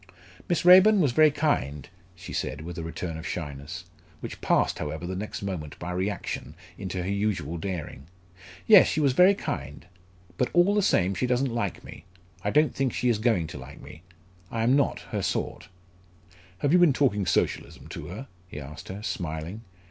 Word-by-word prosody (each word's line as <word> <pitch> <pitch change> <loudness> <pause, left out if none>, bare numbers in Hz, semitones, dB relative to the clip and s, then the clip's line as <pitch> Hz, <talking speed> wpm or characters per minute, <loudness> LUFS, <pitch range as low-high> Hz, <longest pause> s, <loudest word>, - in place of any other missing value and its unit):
"Miss 175 - 0
Raeburn 190 +4 +8
was 145 -8 +3
very 155 +5 +6
kind," 75 - -1 0.3
she 90 0 -9
said, - - -3
with 85 +2 -7
a - - -4
return 80 0 -5
of 85 - -6
shyness, 80 0 -6 0.3
which - - -8
passed - - +2
however 80 +3 -4
the 95 +1 -4
next 100 +1 -5
moment 85 -7 -5
by 85 +1 -5
reaction, 90 -6 -3 0.2
into 95 -2 -4
her - - -4
usual 100 -6 -1
daring. 80 -6 -5 0.6
"Yes, 210 -4 +8
she - - 0
was 140 -4 +3
very 185 +7 +6
kind! - - -5 0.5
but - - +2
all 175 +3 +4
the 210 - +3
same 95 - +2
she 125 +7 -1
doesn't 125 0 +1
like 105 -6 -2
me - - -12 0.4
I 105 - 0
don't 150 +6 +3
think 135 -3 -1
she 125 - 0
is 115 -3 +1
going 110 -7 +2
to - - -8
like - - -11
me 80 - -12 0.5
I 115 0 -2
am 125 +4 +4
not 140 - +1
her - - -1
sort." - - -3 0.9
"Have 145 - +1
you 180 - +6
been 175 -5 +6
talking 105 -9 +1
Socialism - - -1
to 75 - -7
her?" 105 - -7 0.2
he 80 - -8
asked 70 0 -9
her, 100 +3 -7
smiling. 85 -1 -4
100 Hz, 185 wpm, -27 LUFS, 85-135 Hz, 0.9 s, Raeburn